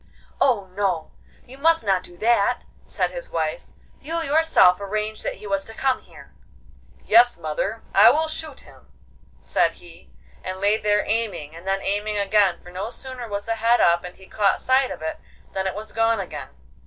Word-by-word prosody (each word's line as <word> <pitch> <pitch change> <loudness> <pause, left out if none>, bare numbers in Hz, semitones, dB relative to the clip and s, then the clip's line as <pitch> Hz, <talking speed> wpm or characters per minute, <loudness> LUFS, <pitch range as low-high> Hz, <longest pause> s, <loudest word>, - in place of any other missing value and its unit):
'Oh 230 -7 +2
no, 185 -6 -1 0.3
you 265 +2 -14
must 325 0 +3
not 195 -3 +2
do 175 -1 -11
that,' 235 +2 +2 0.2
said - - -1
his - - -8
wife; - - -2 0.3
'you 330 +3 -3
yourself 285 - +4
arranged 215 +2 -3
that - - -3
he - - -13
was 195 -1 -1
to 225 - -11
come 265 +1 0
here.' - - -16 0.7
'Yes, 240 +2 +5
mother, 170 +7 -3
I 200 - +8
will 320 +1 +2
shoot 315 -3 -6
him,' - - -18 0.5
said - - +1
he, 170 -1 -16 0.3
and 185 0 -5
lay 205 +2 +3
there 210 -1 +1
aiming, 200 -9 -2
and 170 +3 -12
then 195 0 0
aiming 205 +1 -1
again, 200 -3 +2
for 180 - -12
no 190 +5 -4
sooner 255 -1 -8
was 205 -1 -4
the 225 0 -2
head 230 +2 +3
up 170 0 +4
and 180 0 -8
he 190 - -16
caught 200 0 +1
sight 260 0 +2
of - - -7
it 160 - -4 0.3
than 190 0 -1
it 190 - -3
was 215 +1 -7
gone 225 0 +2
again. 150 -8 -6
210 Hz, 190 wpm, -23 LUFS, 190-240 Hz, 0.7 s, I